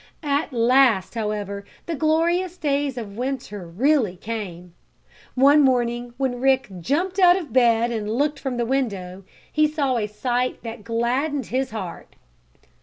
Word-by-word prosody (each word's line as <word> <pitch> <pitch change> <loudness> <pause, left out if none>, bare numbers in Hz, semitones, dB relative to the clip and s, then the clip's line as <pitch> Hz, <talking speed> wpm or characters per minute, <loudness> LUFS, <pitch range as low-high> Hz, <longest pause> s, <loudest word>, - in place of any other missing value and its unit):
At 290 +1 0
last, 240 -4 +3
however, 210 -3 -3 0.2
the 335 - -3
glorious 335 +4 +1
days 285 -3 -1
of 210 -3 -7
winter 240 -7 -4
really 230 - +1
came. 180 -4 -6 0.6
One 280 +3 +6
morning 240 -2 +1
when 255 -3 -2
Rick 265 -3 +2
jumped 350 - -1
out 360 -1 +7
of 310 -11 -7
bed 235 -2 +4
and 215 -2 -3
looked 290 +6 0
from 260 -3 -3
the 240 - 0
window, 200 -8 -2 0.3
he 305 0 +4
saw 285 -4 0
a 210 -2 -1
sight 245 +4 -2
that 230 -2 -7
gladdened 250 +5 -1
his 260 0 0
heart. 195 -7 -7
250 Hz, 145 wpm, -23 LUFS, 220-285 Hz, 0.6 s, out